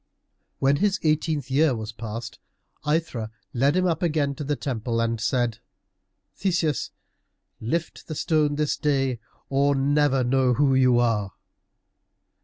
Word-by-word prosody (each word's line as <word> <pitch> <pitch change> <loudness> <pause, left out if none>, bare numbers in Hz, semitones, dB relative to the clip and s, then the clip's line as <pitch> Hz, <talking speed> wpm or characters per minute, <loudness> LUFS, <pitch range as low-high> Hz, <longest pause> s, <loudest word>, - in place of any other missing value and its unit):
When 140 +1 +2
his 200 +2 +1
eighteenth 155 -3 0
year 145 -1 +3
was 110 0 -5
past, 115 +1 -7 0.5
Aithra 150 -8 -1 0.2
led 140 +5 +2
him 185 0 +2
up 175 +1 0
again 150 -5 +1
to 145 - -6
the 145 +1 -1
temple 115 -4 -2
and 115 -1 -1
said, 120 -1 0 0.8
"Theseus, 170 - 0 0.7
lift 165 +9 -3
the 155 - -5
stone 150 -2 +1
this 150 0 0
day, 135 -5 0 0.3
or 140 +1 +2
never 140 -1 +2
know 125 0 +2
who 140 +1 +3
you 130 -2 +4
are." 110 -5 +1
135 Hz, 135 wpm, -25 LUFS, 120-150 Hz, 0.8 s, you